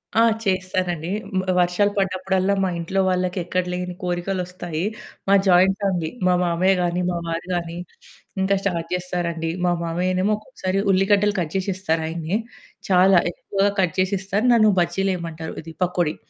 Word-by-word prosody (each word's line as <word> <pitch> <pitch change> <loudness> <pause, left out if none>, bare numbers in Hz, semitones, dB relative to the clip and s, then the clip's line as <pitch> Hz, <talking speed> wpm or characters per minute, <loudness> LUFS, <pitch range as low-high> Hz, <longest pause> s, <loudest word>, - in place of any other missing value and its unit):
ఆ! 225 - +5 0.2
చేస్తానండి. 185 -4 -1 0.3
మ్ - - +3 0.2
వర్షాలు 180 +3 +2
పడ్డప్పుడల్లా, 190 0 +1
మా 190 - +1
ఇంట్లో 180 +3 -2
వాళ్ళకెక్కడ 180 0 0
లేని 180 0 -4
కోరికలొస్తాయి. 180 -2 -3 0.4
మాది 195 0 +5
జాయింట్ 185 +1 +5
ఫ్యామిలీ. 180 -5 0 0.2
మా 180 - +4
మామయ్య 180 +2 +2
గానీ, 175 0 0
మా 175 - -1
వారు 165 +1 -3
గానీ, 170 -1 -3 0.6
ఇంక 190 +1 +2
స్టార్ట్ 170 -4 -2
జేస్తారండి. 175 -2 -2 0.2
మా 175 - +3
మామయ్యనేమో 185 +4 0
ఒక్కొక్కసారి 195 -3 -3
ఉల్లిగడ్డలు 200 +2 +3
కట్ 165 -3 -3
జేసిస్తారు 185 -4 -1
ఆయనే. 165 +4 -2 0.5
చాలా 185 0 +6
ఎక్కువగా 195 +3 0
కట్ 175 -4 +1
చేసిస్తారు, 195 +3 0
నన్ను 215 -2 +5
బజ్జీలెయమంటారు, 170 -2 -2
ఇది 165 0 -10
పకోడి. 175 -3 0
180 Hz, 135 wpm, -22 LUFS, 175-195 Hz, 0.6 s, చాలా